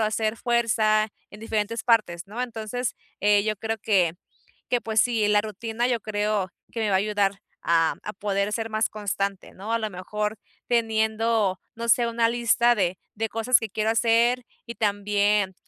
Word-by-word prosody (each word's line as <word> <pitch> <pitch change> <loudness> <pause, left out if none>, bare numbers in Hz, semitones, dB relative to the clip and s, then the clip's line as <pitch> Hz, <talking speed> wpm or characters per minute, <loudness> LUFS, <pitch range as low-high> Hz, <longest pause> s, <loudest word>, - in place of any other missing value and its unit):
o - - +3
hacer 215 +1 0
fuerza 220 -3 +2 0.2
en 210 - -12
diferentes 220 0 -2
partes, 215 -8 +2
¿no?, 220 +5 -4
entonces, 235 0 -3 0.3
eh, 205 0 +4
yo 215 -1 -1
creo 225 +2 -3
que 190 -6 +2 0.6
que 245 - +1
pues 220 -1 +2
sí, 225 -3 +2
la 210 0 +4
rutina 225 +3 -3
yo 240 -2 0
creo 210 -2 -1 0.2
que 230 - -4
me 215 -2 +1
va - - +2
a - - +4
ayudar 205 -2 +1 0.3
a 165 -1 +3
a 210 - -4
poder 200 +1 -1
ser 225 +1 -2
más 215 +1 +1
constante, 200 -2 -3
¿no?, 205 +4 -5
a 230 - +2
lo 215 -1 -3
mejor 210 +3 -3 0.3
teniendo, 220 -3 +1 0.2
no 235 0 -4
sé, 235 +1 +4
una 230 0 +2
lista 235 0 +3
de 185 -4 0 0.2
de 225 +1 -2
cosas 230 +2 +3
que 225 - -4
quiero 215 +2 0
hacer 235 +2 +3 0.2
y 235 - -7
también, 205 -1 +1
215 Hz, 180 wpm, -25 LUFS, 205-230 Hz, 0.6 s, eh